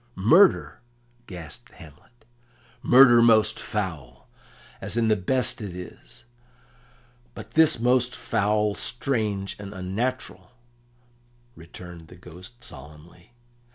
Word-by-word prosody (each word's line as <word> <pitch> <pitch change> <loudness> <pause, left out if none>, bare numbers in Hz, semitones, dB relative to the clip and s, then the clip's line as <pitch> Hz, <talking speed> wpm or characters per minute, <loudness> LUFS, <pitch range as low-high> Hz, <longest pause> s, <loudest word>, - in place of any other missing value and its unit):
"Murder!" 165 - +3 0.5
gasped 90 +6 -10
Hamlet. 90 +8 -18 0.6
"Murder 120 -2 +6
most 110 -2 +4
foul, 85 - -6 0.5
as - - -3
in 115 -1 +1
the 110 - +4
best 120 +6 0
it 100 -4 -7
is; 90 0 -11 1.1
but - - -11
this 160 -4 +3
most 125 +1 +1
foul, 105 0 0
strange, 105 -6 -3
and 100 0 -9
unnatural," 115 +8 -5 1.0
returned 85 0 -12
the 90 - -15
Ghost 90 +7 -14
solemnly. 75 - -14
105 Hz, 100 wpm, -24 LUFS, 90-120 Hz, 1.1 s, Murder